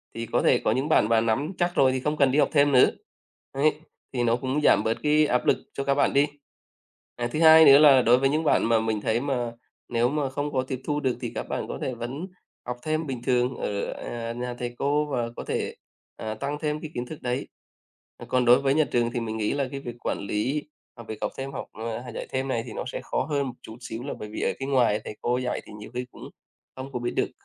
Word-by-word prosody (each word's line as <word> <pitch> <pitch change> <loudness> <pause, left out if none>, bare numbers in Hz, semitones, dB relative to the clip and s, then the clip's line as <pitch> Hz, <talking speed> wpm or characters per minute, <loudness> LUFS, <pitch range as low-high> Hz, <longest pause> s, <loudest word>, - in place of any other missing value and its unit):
thì 115 - -4
có - - 0
thể - - +4
có - - 0
những 130 +6 0
bạn 110 -8 +4
mà 115 -1 +4
nắm 115 +8 0
chắc 175 0 0
rồi 130 -1 +5
thì 130 - -1
không 150 +4 -1
cần 140 -3 +4
đi 145 - +2
học - - +4
thêm 145 -1 +4
nữa, 130 -2 +6 0.6
ấy, 150 +2 +1 0.3
thì 125 -2 0
nó 115 -1 +3
cũng 130 +4 -1
giảm - - +4
bớt 110 +1 0
cái 150 0 +4
áp 125 -3 +1
lực - - +4 0.2
cho 140 - -3
các 140 0 +1
bạn 145 - +2
đi. 140 +1 +4 0.9
À, 120 - -2
thứ 155 - -1
hai 160 0 +9
nữa 140 -2 +9
là 140 -4 +7
đối 120 +1 +5
với 135 +1 +2
những 155 +3 0
bạn - - +3
mà 115 -1 +4
mình 110 -1 -1
thấy 110 +3 0
mà 125 -4 -2 0.4
nếu 120 0 +2
mà 145 -1 -1
không 145 +2 -3
có 130 - +1
tiếp 130 -1 -5
thu 150 0 -1
được 130 -4 0
thì - - -4
các - - -2
bạn - - -3
có - - -5
thể 130 - -2
vẫn 125 +8 -5 0.4
học 125 0 -3
thêm 155 +1 -1
bình 130 -4 -5
thường 125 0 +1
ở, 100 -1 -3
à, 115 -1 -5
nhà 125 +1 -4
thầy 120 0 -4
cô 145 +2 +1
và 125 -5 -2
có - - -6
thể, - - -2 0.4
ờ, 110 0 -4
tăng 140 +6 -4
thêm 150 0 -1
cái 155 - -7
kiến 120 0 -3
thức 155 +3 -9
đấy. 125 +2 -2 0.8
Còn 125 -1 +2
đối 120 +1 +7
với 135 0 +2
nhà 155 +1 +4
trường 120 -1 +2
thì 120 - -2
mình 110 -1 -4
nghĩ 105 -1 0
là 140 -2 -1
cái 140 - -4
việc 120 -3 -7
quản - - -2
lý 105 +9 -1 0.3
học 115 -2 -11
việc 110 - -5
học - - -1
thêm 135 +1 -4
học - - -5 0.4
hay 120 - -8
dạy - - -5
thêm 130 +1 -2
này 120 -3 0
thì 115 - -7
nó - - -4
sẽ - - -4
khó - - -1
hơn 145 -3 -1
một 125 - -7
chút 110 - -10
xíu 115 -1 -6
là 140 - -4
bởi 105 - -7
vì - - -5
ở - - +1
cái 135 - -4
ngoài 120 -6 +3
thầy 105 - -7
cô 120 +1 +1
dạy 125 -1 -2
thì - - -12
nhiều 105 - -10
khi 125 0 -3
cũng - - -13 0.5
không 130 +1 -7
có 125 - -2
biết 120 - -1
được. - - +1
130 Hz, 265 wpm, -26 LUFS, 120-145 Hz, 0.9 s, hai